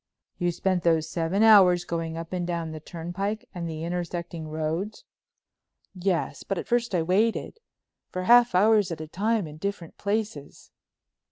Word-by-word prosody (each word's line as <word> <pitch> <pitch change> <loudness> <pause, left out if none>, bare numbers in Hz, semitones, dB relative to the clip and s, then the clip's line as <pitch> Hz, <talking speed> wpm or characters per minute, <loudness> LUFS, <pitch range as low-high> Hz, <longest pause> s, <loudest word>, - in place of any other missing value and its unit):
"You 175 -1 +1
spent 185 +1 0
those 165 -2 +2
seven 175 +5 0
hours 185 -5 +7
going 165 -1 -3
up 165 +2 -7
and 175 -1 -2
down 170 -2 -3
the 155 - -6
turnpike 175 +7 -4
and 170 -3 -4
the 160 0 -5
intersecting 170 -1 -4
roads?" 160 +7 -3 0.9
"Yes, 185 -2 -1
but 195 - -3
at - - -4
first 240 -4 +1
I 170 - +2
waited—for 205 - -3
half 240 0 +6
hours 210 0 +4
at 165 - -4
a 155 - -5
time 210 +4 0
in 150 -1 -10
different 200 -2 -5
places." 200 -8 -3
175 Hz, 155 wpm, -26 LUFS, 165-200 Hz, 0.9 s, hours